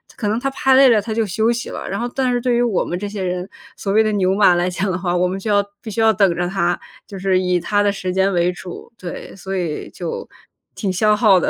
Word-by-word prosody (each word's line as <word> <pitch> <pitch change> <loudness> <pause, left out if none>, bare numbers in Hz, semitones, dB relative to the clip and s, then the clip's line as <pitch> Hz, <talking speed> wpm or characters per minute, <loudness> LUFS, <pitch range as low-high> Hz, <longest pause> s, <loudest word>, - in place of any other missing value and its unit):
可 210 -3 -2
能 220 +2 0
他 275 - -1
拍 265 0 +3
累 270 -1 +8
了， 225 -4 +5
他 220 +1 -4
就 225 0 +1
休 220 +4 +1
息 240 0 -3
了。 - - -6
然 195 - -3
后 240 - -1
但 260 -2 +1
是 245 - +1
对 245 0 +1
于 240 - +2
我 230 -6 +1
们 175 - -3
这 205 +2 -4
些 205 -2 -5
人， 180 +1 -3 0.3
所 195 - -3
谓 215 +2 +5
的 215 - 0
牛 190 -2 +2
马 195 -3 +5
来 175 +1 +1
讲 190 +2 -2
的 185 - -1
话， 175 -1 -1
我 180 +1 +2
们 190 +1 -3
就 210 +2 -3
要 205 0 +4 0.2
必 220 - -7
须 225 - -4
要 225 0 +5
等 195 -3 +3
着 175 - 0
他， 175 -2 0 0.3
就 195 -2 -9
是 190 -1 +2
以 180 -1 +1
他 205 +4 +1
的 205 - +3
时 185 -2 -4
间 190 +1 +2
为 175 0 +2
主。 180 +6 -10
对， 180 -4 -8
所 190 0 -5
以 165 -4 -3
就 170 -3 -6 0.5
挺 200 -4 -2
消 210 +3 +3
耗 210 -5 +5
的。 - - +1
195 Hz, 305 characters per minute, -20 LUFS, 180-220 Hz, 0.5 s, 累